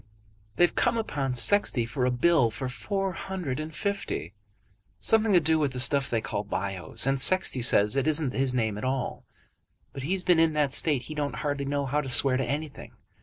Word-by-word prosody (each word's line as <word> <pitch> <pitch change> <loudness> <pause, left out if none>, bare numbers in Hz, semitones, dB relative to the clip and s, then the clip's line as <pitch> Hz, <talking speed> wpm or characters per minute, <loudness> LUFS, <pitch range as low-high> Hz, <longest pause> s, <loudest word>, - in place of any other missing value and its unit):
"They've 175 - +3
come - - +1
upon 140 - -3
Sexty 125 - +2
for 125 +2 -2
a - - +2
bill 125 0 +2
for 130 +4 -5
four 195 +8 -3
hundred 180 -8 -5
and 155 +1 -6
fifty, 180 - -4 0.7
something 220 -1 +2
to 180 - +6
do 160 0 +1
with 145 -4 -1
that 125 - -5
stuff 135 +2 +2
they 115 -2 -1
call 105 - -4
Bios, 95 -3 -2
and 135 0 +2
Sexty 185 -8 +3
says 105 0 +4
it 135 +1 0
isn't 150 -4 +2
his 135 -1 0
name 110 -4 -2
at - - -8
all. 130 -1 -3 0.7
But 135 - -7
he's 180 +7 -2
been 180 -2 +3
in 165 -1 +3
that 145 -3 0
state 145 -6 +1
he 155 - -8
don't 145 -4 -3
hardly 145 -1 -2
know 140 0 -2
how 145 +3 -1
to 135 - -7
swear 130 +2 +4
to 135 - -1
anything. 145 +4 -6
140 Hz, 205 wpm, -26 LUFS, 125-160 Hz, 0.7 s, to